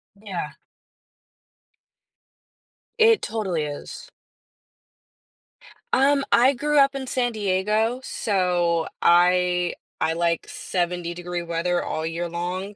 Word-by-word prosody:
Yeah. 190 -7 -6 2.5
It 450 -1 +5
totally 195 -8 -2
is. 145 0 -8 1.8
Um, 275 +1 +3
I 255 +3 +5
grew 295 +3 +1
up 275 0 +4
in 265 -1 -5
San 245 -2 0
Diego, 215 +4 0
so 175 -7 0
I 180 0 +3 0.3
I 160 0 +1
like 170 0 -1
70 175 -1 -3
degree 175 0 -5
weather 170 +1 -1
all 160 0 -3
year 165 +2 -3
long. 180 +4 -4
180 Hz, 100 wpm, -23 LUFS, 170-225 Hz, 2.5 s, It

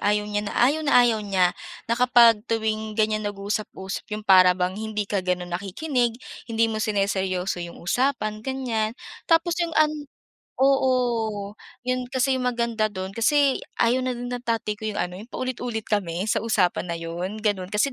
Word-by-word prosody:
ayaw 210 0 +1
niya 205 0 -2
na - - -7
ayaw 280 +6 +3
na 290 -2 0
ayaw 225 -2 +2
niya 190 -3 +2 0.3
na 230 - -2
kapag 240 -3 +6
tuwing 220 -1 -1
ganyan 215 -1 +1
nag-usap-usap 200 -1 -5
yung 210 -1 -5
para 185 -2 +6
bang 180 0 0
hindi 215 0 -3
ka 200 0 -1
gano'n 180 -1 -2
nakikinig, 235 - -1 0.3
hindi 230 0 +2
mo 220 -1 -1
sineryoso 190 -3 -1
yung 170 0 -7
usapan 215 0 0
ganyan. 235 -3 -2 0.3
Tapos 330 +1 +3
yung 335 -1 -1
an 310 0 +4 0.7
oo 240 -6 +1 0.3
yun 255 0 -1
kasi 265 0 +1
yung 250 -1 0
maganda 235 -2 0
do'n 190 0 -5
kasi 275 +5 +2 0.2
ayaw 240 +2 +3
na 255 - 0
din 245 +1 -5
ng 245 - -3
tatay 225 -2 -1
ko 220 - -9
yung 210 - -4
ano, 180 0 -3
yung 220 - -11
paulit-ulit 245 -3 -4
kami 185 -3 -1
sa 220 - +1
usapan 185 -5 +1
na 170 - -2
yun 175 +5 -5
gano'n. 200 -4 -1
Kasi 235 +6 +1
215 Hz, 175 wpm, -24 LUFS, 195-245 Hz, 0.7 s, kapag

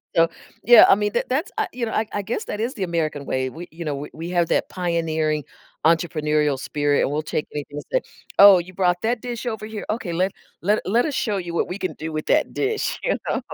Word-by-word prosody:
so 165 0 +5 0.3
Yeah, 240 -1 +9
I - - +7
mean, 210 0 -1
th 235 - 0
that's 300 +9 -1
I 435 - +1
you 240 -2 -2
know, - - -4
I 220 - +1
I 205 - -1
guess 240 - -3
that 210 - -5
is 250 +4 -2
the 195 - -3
American 155 -5 -2
way, 130 0 -1
we 170 +6 -9
you 165 0 -7
know, 145 -2 -1
we 145 +2 -6
we 165 +2 -6
have 175 -2 +1
that - - +1
pioneering 160 -4 -1 0.4
entrepreneurial 150 -4 +2
spirit 145 0 +1
and - - 0
we'll 150 +1 -1
take 150 - -2
anything 145 0 -6
and - - -5
say, - - +3 0.4
"Oh, 200 -2 +10
you 180 +2 -7
brought 180 -1 +1
that 230 +1 0
dish 245 -1 -5
over 220 -2 -3
here? 215 -1 -6
Okay, 210 -6 -2
let 185 +3 +1 0.3
let 205 +5 +2
let 230 +8 +2
us 290 - -3
show 210 -4 0
you 170 -2 -5
what - - +1
we 185 +3 -5
can 185 - -2
do 160 +1 -5
with 155 - -4
that - - +2
dish." 425 +1 -1
You - - +1
know? - - 0
175 Hz, 250 wpm, -23 LUFS, 155-220 Hz, 0.4 s, Oh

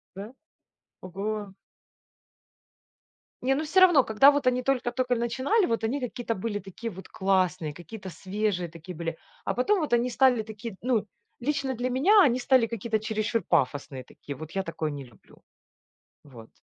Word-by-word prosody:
Да? 200 +4 -8 0.7
Oго! 200 +2 -5 1.9
Не, 265 +2 +2
ну, 290 - -1
всё 335 +5 +3
равно, 350 -8 +7
когда 220 +6 +6
вот 285 -2 -1
они 250 0 +2
только 250 -2 0
тока 250 0 0
начинали, 260 - +1
вот 225 -1 -1
они 260 +6 -1
какие-то 245 -2 -3
были 205 +1 -3
такие 200 +4 -7
вот 190 -1 -11
классные, 185 -5 0
какие-то 190 +5 -9
свежие 190 +1 -2
такие 165 +2 -10
были, 165 0 -4 0.3
а - - -1
потом 380 +11 +2
вот 305 -6 -3
они 240 +1 +2
стали 250 -2 +3
такие, 215 0 -8
ну, 235 -4 +1 0.3
лично 275 0 -1
для 250 +1 -2
меня, 375 +12 +5
они 250 -2 +3
стали 255 -2 +3
какие-то 225 -1 -2
чересчур 215 +1 -1
пафосные 140 -4 -1
такие, 140 +2 -9
вот 155 +3 -9
я 195 - -1
такое 165 -3 -3
не 140 -2 -6
люблю. 120 -5 -20 0.8
Вот. 120 -6 -13
220 Hz, 160 wpm, -27 LUFS, 185-255 Hz, 1.9 s, равно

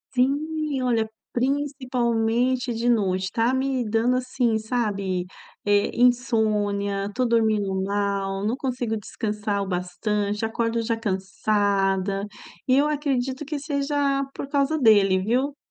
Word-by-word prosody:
Sim, 295 +3 0
olha, 230 -3 +1 0.2
principalmente 250 -2 0
de 230 +1 -2
noite, 190 -5 +1
tá 230 +2 +2
me 265 -1 0
dando, 235 +3 +2
assim, 250 -3 0
sabe, 205 -6 -1 0.4
eh, 205 0 +3
insônia, 210 -5 +2
estou 245 +5 -1
dormindo 220 -4 +2
mal, 200 0 -1
não 225 +3 +1
consigo 245 -4 -2
descansar 210 -1 -3
o 195 - -6
bastante, 200 +4 -2
acordo 230 +1 -1
já 230 0 0
cansada, 195 -1 0 0.4
e 255 - +4
eu 290 +2 +4
acredito 275 -3 -1
que 300 +1 -4
seja 280 -1 0
por - - -5
causa 280 +2 +1
dele, 205 -7 +5
viu. 255 +8 0
230 Hz, 120 wpm, -24 LUFS, 205-260 Hz, 0.4 s, dele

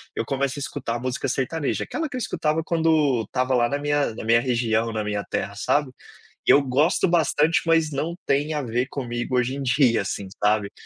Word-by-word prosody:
eu - - -1
começo 135 +2 -1
a - - -5
escutar 125 -4 -4
música 130 0 -2
sertaneja, 140 +2 -1
aquela 320 +1 -3
que 285 - -8
eu - - -2
escutava 160 -8 -1
quando 155 -7 +2
estava 130 +3 -1
lá 120 -2 +3
na 140 - -1
minha 145 -4 0
na - - -7
minha 115 +1 +4
região, 115 -2 0
na 110 -1 -2
minha 105 -1 -2
terra, 100 - -3
sabe. 140 +6 0 0.6
Eu 140 - +7
gosto 140 +8 +2
bastante, 165 -2 +2
mas 165 -2 +2
não 160 +5 -3
tem 145 +3 +1
a 150 - -1
ver 120 0 -1
comigo 120 -2 -3
hoje 125 +1 +1
em 140 - -4
dia, 125 -2 +3
assim, 100 0 -4 0.2
sabe. 105 -1 +2
135 Hz, 200 wpm, -24 LUFS, 120-150 Hz, 0.6 s, Eu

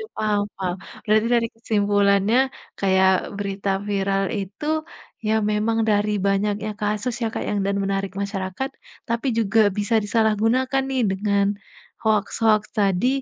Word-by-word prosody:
paham 210 -1 +1
paham. 180 -2 -2 0.3
Berarti 215 +1 +3
dari 230 -1 +2
kesimpulannya, 205 0 +2 0.4
kayak 190 -1 +4 0.3
berita 200 0 -3 0.2
viral 195 0 +1 0.2
itu 195 +9 -7 0.6
ya 215 - +2 0.2
memang 225 +2 +1
dari 210 0 +2 0.2
banyaknya 205 +2 0
kasus 210 +4 -1
ya, - - +1
Kak, - - -3
ya, - - -1
dan 200 - 0
menarik 195 0 -2
masyarakat 200 +5 -3 0.4
tapi 235 +4 -1
juga 225 0 +2 0.2
bisa 205 +2 +1
disalahgunakan 225 +5 +2
nih 260 -2 +1
dengan 200 +1 +1 0.6
hoaks-hoaks 215 0 +2
tadi 200 +2 +2
210 Hz, 125 wpm, -23 LUFS, 195-225 Hz, 0.6 s, kayak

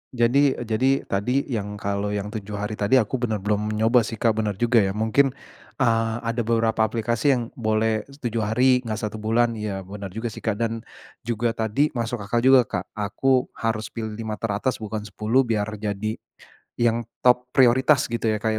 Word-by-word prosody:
Jadi 130 +4 +3
eee, - - -5
jadi 115 +3 +1
tadi 125 +8 0
yang 105 -3 -3
kalau 100 0 -2
yang 105 +1 -4
7 105 -2 -6
hari 105 +1 -4
tadi, 105 +6 +3
aku 125 +1 +2
bener 110 -5 -2
belum 105 +1 0
nyoba 115 +1 +3
sih 115 - -5
Kak. 110 0 +1
Bener 105 -3 -1
juga 120 +2 +3
ya, 95 -1 +1
mungkin, 125 +5 +2 0.4
eee, 115 -3 +1
ada 115 +1 -1
beberapa 115 -1 +1
aplikasi 120 +4 +1
yang 120 - -1 0.2
boleh 110 0 0 0.2
7 115 -1 -1
hari, 125 +4 +3
enggak 110 -3 -5
1 105 0 -4
bulan. 115 +2 +2
Iya, 100 -2 -4
bener 100 +1 -7
juga 115 0 -3
sih - - -9
Kak. 110 -3 -1
Dan 115 0 -2 0.5
juga 120 0 0
tadi 115 +6 0
masuk 120 -3 -3
akal 120 +4 0
juga 130 +1 +6
Kak, 95 -4 -4
aku 125 +5 +1
harus 110 -1 -2
pilih 110 -2 -5
5 110 -1 -5
teratas 115 +4 -1
bukan 110 -1 -4
10 110 +5 +1
biar 110 -4 -1
jadi 105 +1 -3 0.6
yang 120 0 +1 0.2
top 125 0 +4
prioritas 130 +2 +5
gitu 115 -1 -1
ya 110 - +2
Kak 110 +1 -1
110 Hz, 185 wpm, -24 LUFS, 105-120 Hz, 0.6 s, juga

